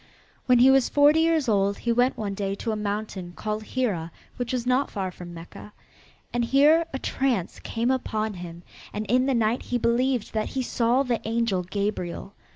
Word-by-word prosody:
When 250 -1 +6
he 255 +2 +7
was 270 -2 +4
forty 295 +2 +5
years 325 -3 +2
old 200 -2 +2
he 235 - -1
went 245 +2 +2
one 210 -3 -3
day 195 0 -2
to 225 - -3
a - - -1
mountain 205 -4 -4
called 215 0 -3
Hira 210 -9 -2 0.3
which 245 -1 -3
was 250 -2 -2
not 255 +3 +2
far 190 -2 -3
from 175 -1 -10
Mecca. 170 +5 -11 0.6
And 240 0 +1
here 295 +7 +4
a 265 - -3
trance 255 -9 -1
came 235 +3 -1
upon 220 -4 -1
him 175 -2 -9 0.3
and 210 +1 -3
in 255 +5 +2
the 270 - +2
night 230 +1 +1
he 245 - -1
believed 245 0 0
that 215 -1 -1
he 260 - +1
saw 240 +2 +1
the 245 -4 -1
angel 225 -4 0
Gabriel. 195 0 -3
230 Hz, 190 wpm, -25 LUFS, 200-255 Hz, 0.6 s, he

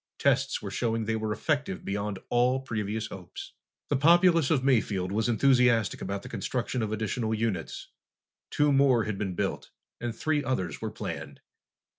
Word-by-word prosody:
Tests - - +1
were - - -5
showing 115 -2 -1
they 110 +1 0
were 110 -1 -2
effective 140 - -2
beyond 100 0 -2
all 125 +2 +3
previous 110 -3 -3
hopes. 90 -3 -9 0.4
The 145 - +2
populace 170 +1 +5
of 140 -5 +2
Mayfield 105 -8 +1
was 110 +3 0
enthusiastic 120 -3 +3
about 100 +1 -4
the - - -8
construction 125 0 -2
of 110 -1 -2
additional 110 +1 -1
units. 105 -7 -3 0.6
Two 145 -1 +2
more 135 -4 +4
had 105 -2 -4
been 95 -3 -2
built, - - -2 0.3
and 120 -1 -4
three 155 -2 0
others 95 -9 -2
were - - -2
planned. - - -6
115 Hz, 160 wpm, -28 LUFS, 105-130 Hz, 0.6 s, populace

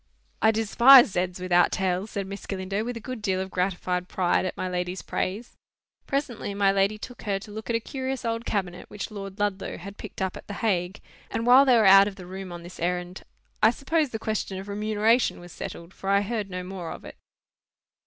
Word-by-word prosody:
"I 220 - +5
despise 235 +3 +7
z's 180 0 -2
without 175 -1 +3
tails," 190 +2 -1
said 200 -2 -3
Miss 200 +1 -8
Galindo, 195 +2 -2
with 240 0 -4
a - - -5
good 255 0 -7
deal 190 -3 0
of 190 0 -4
gratified 180 -1 -1
pride 185 0 +1
at - - -6
my 185 - -2
lady's 180 0 -3
praise. 210 +6 -3 0.5
Presently, 260 -7 -2
my 200 -1 +3
lady 195 +2 +1
took 245 +3 -9
her 200 -2 -1
to 205 +2 -10
look 220 +2 -8
at 235 - +1
a - - +2
curious 260 +1 -4
old 230 0 -1
cabinet, 185 -6 -3
which 210 +1 -6
Lord 195 -2 -7
Ludlow 205 -2 -2
had 200 +3 -9
picked 215 - -9
up 190 -1 -1
at - - -11
the 205 - -6
Hague; 190 -3 -1 0.3
and 230 - -2
while 255 +3 +7
they 255 -3 +5
were 220 - +4
out 195 +1 +8
of 205 - -5
the 185 -2 -10
room 190 0 -7
on 175 0 -8
this 175 +1 -11
errand, 180 +1 -2 0.4
I 215 - +7
suppose 295 +5 0
the 225 - -4
question 215 -3 -3
of 190 +1 -7
remuneration 215 +3 +1
was 175 0 -12
settled, 170 +2 -8
for 195 - -6
I 200 0 +4
heard 210 -1 -3
no 180 0 -5
more 180 -2 -6
of - - -9
it. - - -10
200 Hz, 220 wpm, -26 LUFS, 185-220 Hz, 0.5 s, out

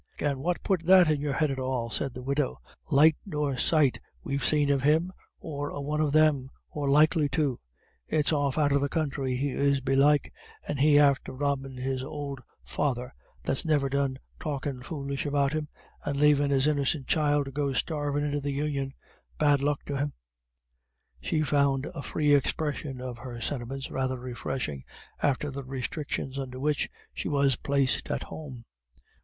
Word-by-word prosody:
"And 140 -2 -1
what 175 +4 -1
put 185 -4 +1
that 185 -4 +7
in 145 -2 0
your 145 -1 -1
head 155 0 +1
at 135 - -3
all?" 130 -3 -2
said 135 +1 -2
the 125 - -7
widow. 140 +1 -1 0.3
"Light 155 +1 +6
nor 150 -7 -2
sight 145 0 +3 0.2
we've 140 -2 -2
seen 145 +1 +3
of 140 -1 +2
him, 160 +6 +2 0.3
or 145 -2 -4
a - - -6
one 150 +2 -1
of 150 -2 +1
them, 150 -4 +3 0.2
or 145 -2 -2
likely 150 +1 +4
to. 140 -6 +1 0.5
It's 150 +1 +1
off 145 -2 +1
out 145 -2 +3
of 140 0 +3
the 140 - 0
counthry 135 -5 -1
he 140 +3 0
is 140 +1 +2
belike, 135 +2 +3 0.3
and 145 - -2
he 145 +1 +6
after 140 -2 +4
robbin' 135 -1 -2
his 130 0 -2
ould 140 -1 -5 0.2
father, 125 -3 -2 0.3
that's 135 - +2
niver 145 -4 +2
done 140 -1 0 0.2
talkin' 140 -3 -3
foolish 140 0 -4
about 140 0 +1
him, 155 -1 -2 0.4
and 140 -1 -2
lavin' 145 -1 +4
his 135 -1 +3
innicent 145 -2 +1
child 145 -1 +2
to 135 - -7
go 140 0 -1
starvin' 145 +1 -1
into 145 0 -1
the 140 0 -2
Union 140 -2 -2 0.4
bad 145 -2 +3
luck 145 0 0
to 140 - -3
him." 145 +1 -1 1.1
She 155 - 0
found 140 -2 +2
a 170 -5 -6
free 150 0 +1
expression 145 -1 0
of 125 -2 -6
her 120 0 -7
sentiments 135 +2 -4
rather 130 -1 -1
refreshing 125 - -4 0.4
after 145 +1 +1
the 140 +1 -6
restrictions 135 +1 -3
under 130 -1 -5
which 150 +1 0 0.2
she - - -3
was 140 -3 +3
placed 140 0 0
at - - -1
home. 130 -7 -9
140 Hz, 175 wpm, -28 LUFS, 135-150 Hz, 1.1 s, that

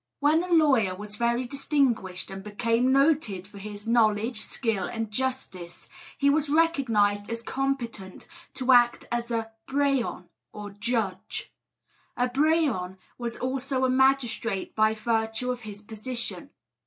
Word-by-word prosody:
When 300 +3 +4
a - - -5
lawyer 270 - +4
was 210 +1 -7
very 235 +2 +1
distinguished, 245 -9 0
and 195 0 -7
became 230 +4 +1
noted 275 - +2
for 200 0 -12
his 205 +1 -8
knowledge, 225 0 +2
skill, 225 -6 -2
and 225 -2 -4
justice, 210 -8 -4 0.3
he 280 - +2
was 295 +1 +3
recognised 235 -11 +2
as 230 0 -4
competent 240 -8 -3 0.3
to 260 0 +1
act 240 -1 +5
as 240 0 -2
a 225 -1 -2 0.2
Brehon 275 -9 0 0.2
or 205 -1 -8
judge. 210 -2 -2 0.6
A 250 - +2
brehon 270 - +1 0.2
was 235 -1 -4
also 260 +1 -1
a 255 - +2
magistrate 255 -6 +1
by 215 0 +3
virtue 225 +2 -1
of 250 - -4
his 210 -2 -9
position. 230 +3 -4
235 Hz, 135 wpm, -27 LUFS, 210-265 Hz, 0.6 s, act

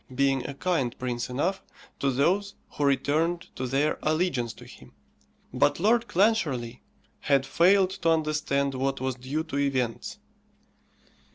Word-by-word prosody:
being 135 -1 +2
a 140 - -6
kind 140 -7 -1
prince 120 -1 -3
enough 170 +10 -1 0.4
to 140 - +1
those 180 +10 +1 0.2
who 145 - -3
returned 150 +5 +1 0.2
to 130 - -3
their 140 +4 0
allegiance 155 -7 0
to 110 - -14
him; - - -15 0.6
but - - +2
Lord 230 +5 +3
Clancharlie 155 - +1 0.4
had 140 -2 +2
failed 185 +6 +4
to 190 -4 -1
understand 150 -3 0
what 135 +1 -1
was 130 0 -1
due 130 +5 -3
to 155 -3 -4
events. 130 -5 -1
140 Hz, 140 wpm, -27 LUFS, 130-170 Hz, 0.6 s, failed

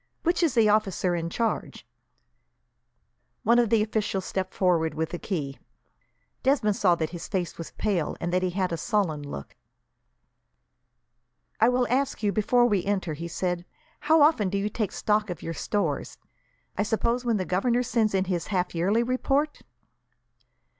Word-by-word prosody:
"Which 345 +1 +1
is 325 -7 +2
the 225 -2 +5
officer 200 -4 +2
in 165 -1 -2
charge?" 225 +5 -2 1.6
One 235 +1 +5
of 235 -3 +2
the 225 -2 +4
officials 210 -3 -2
stepped 190 -1 -3
forward, 170 -4 +2
with 160 +2 -2
a 175 - -3
key. 145 -9 -4 0.8
Desmond 255 -7 +2
saw 180 -4 +3
that 160 -2 -3
his 175 -2 -7
face 180 -4 -3
was 165 - -6
pale, 190 -7 -1
and 175 +1 -3
that 180 - +2
he 185 - +1
had 185 0 -1
a 165 - -1
sullen 180 -5 0
look. 145 - -8 2.0
"I 225 +2 +5
will 250 0 +2
ask 265 -1 0
you, 205 - +2
before 240 +4 +3
we 205 -6 +2
enter," 190 -5 -1
he 165 +3 -6
said, 175 0 -2 0.4
"how 315 0 +4
often 290 - +4
do 200 - -1
you 200 +1 -1
take 210 -2 -2
stock 210 -1 0
of 175 -3 -6
your 165 - -3
stores? 205 +5 -2 0.6
I - - 0
suppose 235 +3 0
when 235 -3 +1
the 185 - -2
governor 235 +8 +1
sends 225 -4 +1
in 190 0 +2
his 180 -3 -2
half 185 -3 -1
yearly 195 +7 +2
report?" 270 +4 0
205 Hz, 165 wpm, -26 LUFS, 175-235 Hz, 2.0 s, the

